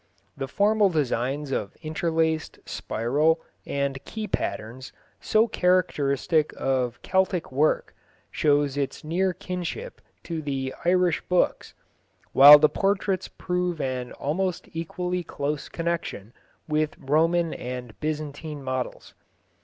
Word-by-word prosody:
The 135 - -4
formal 205 +4 +3
designs 140 -2 -1
of 105 -6 -2
interlaced, 160 0 -1
spiral, 150 +8 0 0.3
and 140 -1 -2
key 220 -1 -5
patterns, 115 - -4 0.3
so 220 +2 +3
characteristic 160 - +1
of 125 -3 0
Celtic 190 -4 0
work, 145 +4 +1 0.4
show 145 -1 +3
its 140 -1 -3
near 180 +5 +1
kinship 185 - -5 0.2
to 165 -2 -4
the 135 -3 -3
Irish 180 -1 +3
books, 180 -1 +1 0.6
while 145 +2 +11
the 150 - +5
portraits 195 +1 0
prove 180 -2 -2
an 130 -2 -3
almost 180 +5 -2
equally 180 +2 -3
close 145 -2 -3
connection 165 - -3 0.3
with 155 0 0
Roman 165 +4 +2
and 125 -2 -6
Byzantine 150 -1 -4
models. 130 -1 -4
155 Hz, 110 wpm, -25 LUFS, 135-180 Hz, 0.6 s, while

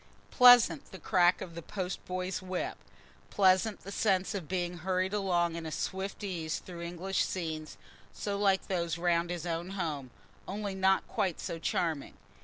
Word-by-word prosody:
Pleasant 245 - +7
the 190 - -8
crack 180 -1 +3
of 170 - -6
the 170 - -6
post 185 +1 -4
boy's 185 0 -3
whip! 185 -1 -3 0.5
Pleasant 195 +1 +3
the 195 - -8
sense 195 -2 +1
of 190 -6 -4
being 175 -1 -2
hurried 185 +2 0
along 175 -4 +1
in 165 -1 -4
swift 190 +5 -4
ease 165 -5 -2
through 175 -2 -9
English 175 +3 -1
scenes, 160 -4 -4 0.3
so 205 -1 -3
like 200 -1 +2
those 170 -3 -1
round 170 0 +1
his 175 -1 -4
own 170 +1 -3
home, 150 -7 -3 0.4
only 200 0 -3
not 190 0 +2
quite 185 -4 -1
so 165 - -4
charming. 160 -3 -1
180 Hz, 160 wpm, -31 LUFS, 170-190 Hz, 0.5 s, Pleasant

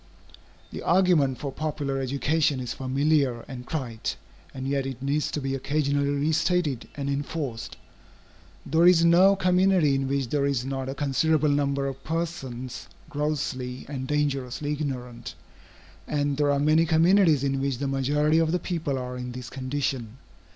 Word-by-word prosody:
The - - -6
argument 170 -8 +3
for 140 - -4
popular 145 -2 -3
education 140 +2 +1
is 125 -2 -4
familiar 135 -2 +1
and 125 -2 -8
trite, 125 -8 -3 0.4
and 130 0 -5
yet 135 -1 0
it 130 -2 -6
needs 145 +2 0
to - - -3
be 135 -1 -2
occasionally 140 +1 0
re 145 +2 +1
stated 165 -5 0
and 140 -1 -4
enforced. 140 -3 -4 0.9
There 165 +3 +4
is 170 -2 +6
no 185 +4 +6
community 185 -4 +3
in 135 0 0
which 135 -2 -1
there 140 0 +1
is 130 -3 -1
not 135 -1 -3
a 135 - -4
considerable 150 +2 +2
number 140 -1 +1
of 135 0 -5
persons 145 -7 -4 0.2
grossly 140 -4 -3
and 135 -2 -5
dangerously 145 -1 -1
ignorant, 125 -5 -5 0.7
and 145 -1 0
there 145 0 +1
are 140 - +2
many 155 +3 +3
communities 165 -2 +4
in 135 -1 0
which 135 -2 -1
the 140 +2 -2
majority 145 +4 +2
of 160 -1 +2
the 180 - +2
people 165 -6 -2
are 125 0 -5
in 125 0 -5
this 125 -1 -8
condition. 130 -3 -3
140 Hz, 160 wpm, -26 LUFS, 135-155 Hz, 0.9 s, is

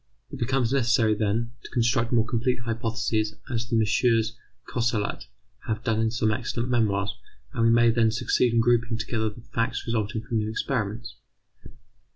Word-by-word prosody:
It - - -7
becomes 130 0 +1
necessary, 115 -4 +3
then, 110 +2 -1
to - - -11
construct 120 -1 +1
more 115 -2 +3
complete 120 +1 -1
hypotheses, 115 -1 -1 0.2
as 115 0 -2
the 120 - 0
MM. 115 0 +2 0.4
Cosserat 115 -3 -1 0.4
have 110 0 -2
done 110 -2 +1
in 110 0 +2
some 110 -1 +1
excellent 120 +1 -2
memoirs, 105 -3 +1 0.4
and 115 -4 +1
we - - +5
may 120 0 +5
then 115 -1 +3
succeed 115 +2 +1
in 115 0 +3
grouping 120 0 +2
together 110 -1 -1
the 105 +3 -12
facts 115 0 -1
resulting 110 -1 -2
from 115 0 -1
new 105 0 -2
experiments. 115 -1 -3
115 Hz, 165 wpm, -26 LUFS, 110-120 Hz, 0.4 s, we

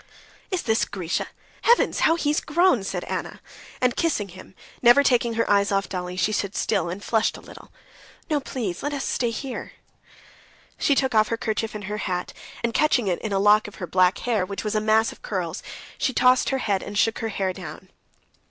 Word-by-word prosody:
"Is 370 -3 -2
this 220 -1 +2
Grisha? 180 -4 -3 0.3
Heavens, 475 +1 +3
how 325 - +4
he's 300 -2 +1
grown!" 330 - +3
said - - -3
Anna; - - -5 0.4
and 250 -1 +2
kissing 280 - 0
him, 185 +1 -13 0.3
never 245 +3 +7
taking 240 -3 +2
her 230 - +1
eyes 200 0 +3
off 195 0 +1
Dolly, 180 -1 -5
she 185 +4 +1
stood 200 -2 -2
still 170 - 0
and 190 +4 -6
flushed 220 -2 +1
a - - -11
little. - - -14 0.6
"No, 300 -3 +1
please, 225 -10 -4
let 290 +1 -2
us 275 - -3
stay 240 - 0
here." 250 +3 -6 1.1
She 285 - +3
took 265 -2 +1
off 215 -1 +4
her 230 - -2
kerchief 220 -1 -2
and 210 - -6
her 210 +2 -4
hat, 180 -3 -3 0.3
and 235 -1 0
catching 260 -7 +2
it 180 -2 0
in 215 - -4
a 195 - +1
lock 210 +2 +4
of 210 - -11
her 185 - -5
black 185 +1 +3
hair, 230 -5 0
which 195 +2 -5
was 210 0 -2
a 215 - +1
mass 220 +1 +3
of - - -15
curls, - - -3 0.4
she 260 - 0
tossed 250 +1 +4
her 270 - 0
head 200 -7 0
and 205 - -6
shook 225 +1 +2
her 225 - -2
hair 190 -2 -1
down. 180 0 -9
215 Hz, 205 wpm, -24 LUFS, 195-250 Hz, 1.1 s, never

